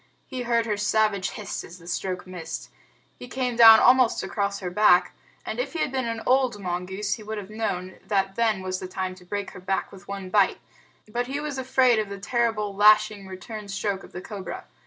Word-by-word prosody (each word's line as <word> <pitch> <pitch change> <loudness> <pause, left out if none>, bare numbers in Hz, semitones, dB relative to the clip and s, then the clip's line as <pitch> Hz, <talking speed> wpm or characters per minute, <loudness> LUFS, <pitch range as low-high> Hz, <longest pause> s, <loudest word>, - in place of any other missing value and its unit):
He 260 -2 -5
heard 235 -1 +1
her 210 -2 -1
savage 210 -2 +1
hiss 205 -3 -6
as 170 - -11
the 170 - -16
stroke 180 +1 -3
missed. 165 -8 -7 0.5
He 250 - -8
came 250 -1 -2
down 225 -1 +10
almost 255 -2 +4
across 200 -1 -2
her 180 -2 -4
back, 180 -2 +4 0.3
and - - -4
if - - -2
he 330 - -3
had 290 - 0
been 260 -2 -1
an 230 -1 -4
old 255 -4 +2
mongoose 190 +2 -3
he 225 - -6
would 215 +1 -5
have 205 0 -7
known 185 -4 -3
that 195 -2 +1
then 220 -3 +1
was 185 0 -3
the 185 - -6
time 185 0 -3
to 185 0 -15
break 205 +2 -4
her - - -10
back 190 +1 -2
with 185 -3 -14
one 195 -2 -6
bite; 200 -1 +3 0.5
but 240 +3 -2
he 275 +2 -3
was 295 -2 -4
afraid 255 -2 +3
of 210 -2 -2
the 200 - -6
terrible 215 -1 -1
lashing 210 -1 +4
return 205 +3 -8
stroke 200 0 -2
of - - -13
the 180 - -7
cobra. 200 -2 -7
210 Hz, 215 wpm, -25 LUFS, 190-230 Hz, 0.5 s, down